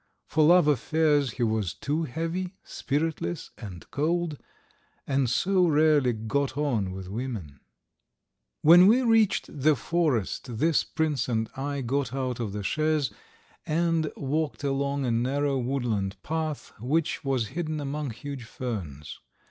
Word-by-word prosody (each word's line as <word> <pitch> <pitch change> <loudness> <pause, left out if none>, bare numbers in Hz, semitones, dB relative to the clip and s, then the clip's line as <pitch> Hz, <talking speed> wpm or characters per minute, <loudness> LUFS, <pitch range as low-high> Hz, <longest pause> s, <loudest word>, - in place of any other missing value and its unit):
For 155 - +2
love 170 0 +6
affairs 150 -2 +2
he 125 - -2
was 110 -5 0
too 150 +9 -1
heavy, 165 +7 -3
spiritless, 160 +3 -3
and 95 -7 -9
cold, 160 0 -1 0.7
and 135 -2 +1
so 180 +8 +3
rarely 150 -4 +4
got 130 +5 -2
on 120 -10 0
with 95 0 -7
women.... 100 - -5 1.0
When 175 +4 +9
we 245 +5 +5
reached 225 -4 +3 0.2
the 155 +2 +5
forest 130 - -1
this 160 +4 +3
prince 150 -6 -1
and 110 -2 -1
I 140 +1 -3
got 130 +1 -1
out 130 -2 -2
of 110 -4 -2
the 105 0 -4
chaise 155 +5 +1 0.6
and 165 0 +1
walked 150 +1 -2
along 140 0 0
a 120 - +1
narrow 135 +4 +1
woodland 120 -7 -1
path 155 -2 -3
which 150 +8 0
was 130 -5 0
hidden 155 0 -3
among 145 0 -3
huge 135 +2 -7
ferns. 95 - -6
140 Hz, 135 wpm, -27 LUFS, 120-155 Hz, 1.0 s, When